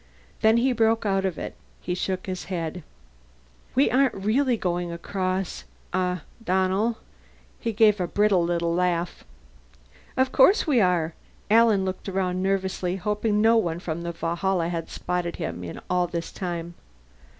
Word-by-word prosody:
Then 220 Hz, +1 st, +5 dB
he 255 Hz, +3 st, +3 dB
broke 225 Hz, -1 st, +2 dB
out 195 Hz, -1 st, +1 dB
of 185 Hz, -3 st, -2 dB
it. -, -, -5 dB, 0.3 s
He 180 Hz, -, -3 dB
shook 185 Hz, +1 st, -2 dB
his 185 Hz, -1 st, -4 dB
head. 175 Hz, -2 st, -4 dB, 0.9 s
"We 270 Hz, +3 st, +4 dB
aren't 265 Hz, +1 st, +3 dB
really 235 Hz, +6 st, +1 dB
going 175 Hz, -2 st, -2 dB
across 185 Hz, +1 st, -3 dB, 0.3 s
huh, 180 Hz, -1 st, 0 dB, 0.2 s
Donnell?" 190 Hz, +4 st, +1 dB, 0.6 s
He 230 Hz, -, -2 dB
gave 210 Hz, -1 st, +4 dB
a 180 Hz, -, 0 dB
brittle 200 Hz, -2 st, +3 dB
little 170 Hz, 0 st, 0 dB
laugh. 175 Hz, -1 st, 0 dB, 0.9 s
"Of 260 Hz, 0 st, +2 dB
course 370 Hz, -, +5 dB
we 270 Hz, -7 st, +3 dB
are!" 175 Hz, -4 st, +2 dB, 0.4 s
Alan 220 Hz, -4 st, +5 dB
looked 185 Hz, +1 st, -4 dB
around 185 Hz, -1 st, -1 dB
nervously, 190 Hz, -1 st, -1 dB
hoping 210 Hz, +2 st, 0 dB
no 225 Hz, +1 st, +5 dB
one 170 Hz, -7 st, 0 dB
from 170 Hz, -2 st, -4 dB
the 170 Hz, 0 st, -3 dB
Valhalla 170 Hz, +1 st, -1 dB
had 165 Hz, -2 st, -4 dB
spotted 175 Hz, -1 st, -3 dB
him 90 Hz, -, -5 dB
in 85 Hz, -, -6 dB
all 180 Hz, -1 st, +1 dB
this 170 Hz, -1 st, -4 dB
time. 175 Hz, -2 st, -4 dB
185 Hz, 150 wpm, -25 LUFS, 175-215 Hz, 0.9 s, Then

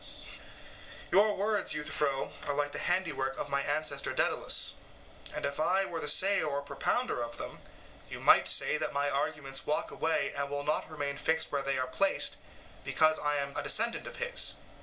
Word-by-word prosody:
SOCRATES: -, -, -2 dB, 0.8 s
Your 205 Hz, +1 st, +5 dB
words, 205 Hz, 0 st, +1 dB
Euthyphro, 150 Hz, -2 st, -1 dB
are 145 Hz, -, -1 dB
like 145 Hz, 0 st, 0 dB
the -, -, -5 dB
handiwork 160 Hz, -7 st, -1 dB
of 145 Hz, -, -3 dB
my 140 Hz, 0 st, 0 dB
ancestor 145 Hz, -1 st, -1 dB
Daedalus; -, -, +1 dB, 0.6 s
and -, -, -3 dB
if 140 Hz, +1 st, -3 dB
I 185 Hz, +5 st, +2 dB
were 170 Hz, -3 st, -4 dB
the 150 Hz, -, -2 dB
sayer 195 Hz, +2 st, +3 dB
or 140 Hz, -1 st, -2 dB
propounder 245 Hz, -, -1 dB
of 120 Hz, 0 st, -5 dB
them, -, -, -6 dB, 0.5 s
you -, -, -7 dB
might -, -, +6 dB
say -, -, +3 dB
that -, -, -2 dB
my 145 Hz, 0 st, 0 dB
arguments 140 Hz, -1 st, -2 dB
walk 150 Hz, -, -1 dB
away 160 Hz, 0 st, 0 dB
and 140 Hz, 0 st, -2 dB
will 145 Hz, 0 st, -3 dB
not 150 Hz, +1 st, -1 dB
remain 145 Hz, -2 st, -4 dB
fixed 160 Hz, +2 st, +1 dB
where 140 Hz, -, 0 dB
they 135 Hz, 0 st, -1 dB
are 130 Hz, -, 0 dB
placed 195 Hz, +10 st, +1 dB, 0.5 s
because 155 Hz, 0 st, +3 dB
I 150 Hz, 0 st, 0 dB
am 140 Hz, -1 st, -2 dB
a -, -, 0 dB
descendant 225 Hz, +12 st, +1 dB
of -, -, -8 dB
his. 485 Hz, +1 st, 0 dB
150 Hz, 185 wpm, -31 LUFS, 140-175 Hz, 0.8 s, might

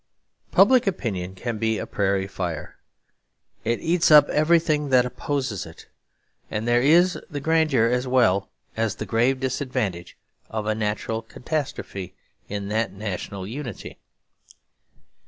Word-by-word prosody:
Public 255 Hz, -4 st, +5 dB
opinion 95 Hz, -, -2 dB
can 115 Hz, +2 st, -4 dB
be 110 Hz, 0 st, +1 dB
a -, -, -4 dB
prairie 95 Hz, -1 st, 0 dB
fire. 90 Hz, -5 st, -5 dB, 0.9 s
It 115 Hz, +1 st, -1 dB
eats 170 Hz, +1 st, +2 dB
up 150 Hz, -1 st, +8 dB
everything 155 Hz, -2 st, +2 dB
that 125 Hz, -1 st, +5 dB
opposes 125 Hz, -4 st, -3 dB
it; 80 Hz, -, -13 dB, 0.6 s
and 110 Hz, +2 st, -3 dB
there 120 Hz, 0 st, +4 dB
is 175 Hz, +7 st, +4 dB
the 145 Hz, -4 st, -4 dB
grandeur 155 Hz, -5 st, +2 dB
as 125 Hz, +2 st, 0 dB
well 110 Hz, -6 st, +3 dB, 0.3 s
as 110 Hz, -2 st, -1 dB
the -, -, -5 dB
grave 125 Hz, +3 st, +1 dB
disadvantages 125 Hz, -9 st, -3 dB, 0.3 s
of 110 Hz, -1 st, -3 dB
a 110 Hz, -, +1 dB
natural 110 Hz, +1 st, -2 dB
catastrophe 120 Hz, -, -5 dB, 0.3 s
in 100 Hz, -1 st, -4 dB
that 110 Hz, +1 st, 0 dB
national 100 Hz, -1 st, -5 dB
unity. 120 Hz, 0 st, -7 dB
115 Hz, 130 wpm, -24 LUFS, 100-145 Hz, 0.9 s, up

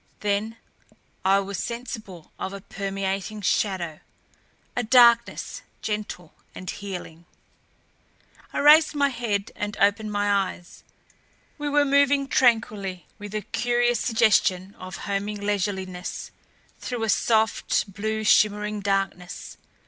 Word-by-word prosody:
Then 210 Hz, +2 st, -1 dB, 0.7 s
I 190 Hz, +1 st, +4 dB
was 195 Hz, -1 st, -5 dB
sensible 225 Hz, -8 st, -6 dB
of 190 Hz, -, -4 dB
a 200 Hz, -, -7 dB
permeating 195 Hz, +1 st, -4 dB
shadow, 180 Hz, -5 st, 0 dB, 0.8 s
a 245 Hz, -, +1 dB
darkness 235 Hz, 0 st, +4 dB, 0.2 s
gentle 210 Hz, -6 st, -4 dB, 0.2 s
and 185 Hz, -, -9 dB
healing. 180 Hz, -5 st, -7 dB, 1.3 s
I -, -, -5 dB
raised 305 Hz, +2 st, +7 dB
my 285 Hz, -1 st, +3 dB
head 220 Hz, -6 st, -2 dB
and 205 Hz, 0 st, -4 dB
opened 205 Hz, +2 st, +2 dB
my 205 Hz, -2 st, +1 dB
eyes. 175 Hz, 0 st, -17 dB, 0.8 s
We 295 Hz, 0 st, -2 dB
were 290 Hz, 0 st, +3 dB
moving 280 Hz, 0 st, +3 dB
tranquilly, 215 Hz, -, +1 dB
with 205 Hz, 0 st, -7 dB
a 215 Hz, -, -1 dB
curious 240 Hz, +3 st, +1 dB
suggestion 195 Hz, -4 st, +2 dB
of 185 Hz, +1 st, -7 dB
homing 205 Hz, +1 st, -2 dB
leisureliness, 190 Hz, -3 st, -3 dB, 0.5 s
through 245 Hz, -3 st, -4 dB
a -, -, 0 dB
soft, 220 Hz, -2 st, +1 dB
blue 220 Hz, +2 st, -2 dB
shimmering 210 Hz, 0 st, +3 dB
darkness. 195 Hz, -3 st, -2 dB
205 Hz, 115 wpm, -25 LUFS, 195-230 Hz, 1.3 s, raised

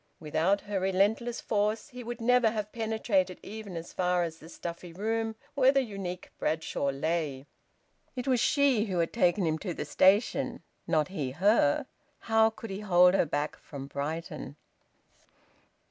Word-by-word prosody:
Without 165 Hz, +6 st, +1 dB
her 205 Hz, -2 st, -2 dB
relentless 205 Hz, +6 st, +1 dB
force, 215 Hz, +4 st, 0 dB
he 250 Hz, -2 st, -9 dB
would 240 Hz, 0 st, -6 dB
never 245 Hz, 0 st, +4 dB
have 210 Hz, -1 st, -4 dB
penetrated 220 Hz, -5 st, 0 dB
even 205 Hz, -4 st, -7 dB
as 165 Hz, +1 st, -8 dB
far 180 Hz, -1 st, +1 dB
as 165 Hz, -1 st, -5 dB
the 160 Hz, -, -13 dB
stuffy 170 Hz, 0 st, -7 dB
room 220 Hz, +4 st, -2 dB, 0.2 s
where 265 Hz, -2 st, +5 dB
the 275 Hz, -1 st, +2 dB
unique 195 Hz, -5 st, -6 dB
Bradshaw 155 Hz, -3 st, -1 dB
lay. 140 Hz, -1 st, -2 dB, 0.7 s
It 250 Hz, +1 st, -4 dB
was 255 Hz, -2 st, +3 dB
she 270 Hz, -5 st, +3 dB
who 190 Hz, -4 st, -3 dB
had 170 Hz, -1 st, 0 dB
taken 185 Hz, -4 st, +2 dB
him 160 Hz, -1 st, 0 dB
to 180 Hz, -2 st, -4 dB
the -, -, -4 dB
station, 190 Hz, -, +2 dB, 0.2 s
not 155 Hz, 0 st, +2 dB
he 155 Hz, -9 st, -3 dB
her. 170 Hz, -, +3 dB, 0.3 s
How 225 Hz, 0 st, +3 dB
could 225 Hz, -1 st, -9 dB
he 195 Hz, -, -4 dB
hold 180 Hz, -3 st, +5 dB
her 195 Hz, -, +3 dB
back 145 Hz, +1 st, -2 dB
from 140 Hz, -2 st, -8 dB
Brighton? 145 Hz, 0 st, -5 dB
190 Hz, 160 wpm, -29 LUFS, 165-220 Hz, 0.7 s, where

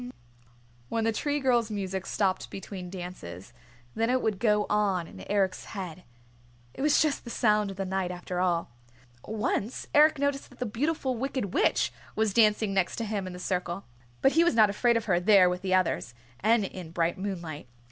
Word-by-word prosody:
When 225 Hz, -, 0 dB
the 225 Hz, -, +2 dB
Tree 290 Hz, +6 st, -1 dB
Girl's 240 Hz, -4 st, +2 dB
music 195 Hz, -2 st, -3 dB
stopped 190 Hz, -2 st, 0 dB
between 190 Hz, -2 st, -7 dB
dances, 150 Hz, -, -8 dB, 0.4 s
then 225 Hz, +1 st, 0 dB
it 255 Hz, +1 st, +3 dB
would 210 Hz, -4 st, 0 dB
go 210 Hz, -2 st, +3 dB
on 200 Hz, -4 st, +1 dB
in -, -, -11 dB
Eric's 195 Hz, -2 st, 0 dB
head. 185 Hz, -4 st, -7 dB, 0.7 s
It -, -, -7 dB
was 295 Hz, +1 st, +4 dB
just 300 Hz, -3 st, -1 dB
the 240 Hz, -, -8 dB
sound 210 Hz, -3 st, +2 dB
of 195 Hz, -, -8 dB
the 195 Hz, -, -2 dB
night 190 Hz, -1 st, -1 dB
after 180 Hz, 0 st, -4 dB
all. 175 Hz, -6 st, 0 dB, 0.6 s
Once 220 Hz, +1 st, -2 dB
Eric 305 Hz, +1 st, +6 dB
noticed 285 Hz, 0 st, -1 dB
that -, -, -18 dB
the 250 Hz, -, -2 dB
Beautiful 260 Hz, +3 st, -1 dB
Wicked 260 Hz, -6 st, -3 dB
Witch -, -, +2 dB, 0.2 s
was 220 Hz, -2 st, +1 dB
dancing 215 Hz, -2 st, +3 dB
next 190 Hz, -2 st, +1 dB
to 230 Hz, -, -3 dB
him 205 Hz, -3 st, -3 dB
in 185 Hz, -, -6 dB
the -, -, -7 dB
circle 180 Hz, +1 st, -3 dB, 0.4 s
but 270 Hz, -, +6 dB
he 330 Hz, +3 st, +4 dB
was 345 Hz, -, +2 dB
not 215 Hz, -3 st, +6 dB
afraid 235 Hz, +3 st, +2 dB
of 230 Hz, -, -3 dB
her 180 Hz, -4 st, +2 dB
there 190 Hz, 0 st, +6 dB
with 180 Hz, 0 st, -1 dB
the 185 Hz, -1 st, +1 dB
others, 180 Hz, -9 st, 0 dB, 0.2 s
and 220 Hz, 0 st, +3 dB
in 185 Hz, -3 st, -7 dB
bright 170 Hz, +1 st, -1 dB
moonlight. 170 Hz, -8 st, -5 dB
200 Hz, 190 wpm, -28 LUFS, 185-230 Hz, 0.7 s, Eric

